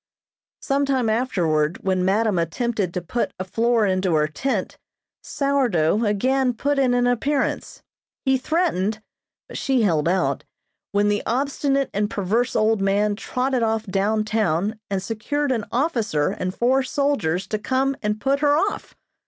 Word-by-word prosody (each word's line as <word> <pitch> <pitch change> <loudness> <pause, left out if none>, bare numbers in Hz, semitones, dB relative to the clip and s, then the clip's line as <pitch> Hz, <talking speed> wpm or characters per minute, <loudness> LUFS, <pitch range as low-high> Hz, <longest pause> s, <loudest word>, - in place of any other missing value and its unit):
Some 280 +1 +1
time 255 -5 +1
afterward, 170 -10 0
when 185 -1 +1
madam 200 0 +2
attempted 200 +3 -1
to 180 - -2
put 235 +7 -2
a 185 - -3
floor 230 +4 +1
into 185 -3 +1
her 150 0 +2
tent, 210 - -3 0.4
"Sourdough" 235 - +1
again 250 +5 +1
put 285 +4 0
in 255 -2 +3
an 245 0 +2
appearance. 265 +4 -1 0.4
He 265 -1 +3
threatened, 225 - 0 0.4
but - - -7
she 265 -4 +1
held 165 -5 +2
out, 185 +1 0 0.5
when 205 +1 +2
the 205 0 +1
obstinate 275 +2 0
and 205 +1 0
perverse 215 +4 -1
old 220 -1 +2
man 205 +1 +1
trotted 255 +4 -1
off 225 -1 0
down 205 +2 0
town 215 -1 0
and 195 -2 -2
secured 270 +7 -2
an 225 -5 -1
officer 230 - 0
and 185 - -3
four 260 +3 +2
soldiers 260 - 0
to 215 +2 -3
come 265 +5 0
and 210 0 -1
put 275 +4 +1
her 290 0 +3
off. 400 +6 -2
220 Hz, 155 wpm, -22 LUFS, 195-265 Hz, 0.5 s, in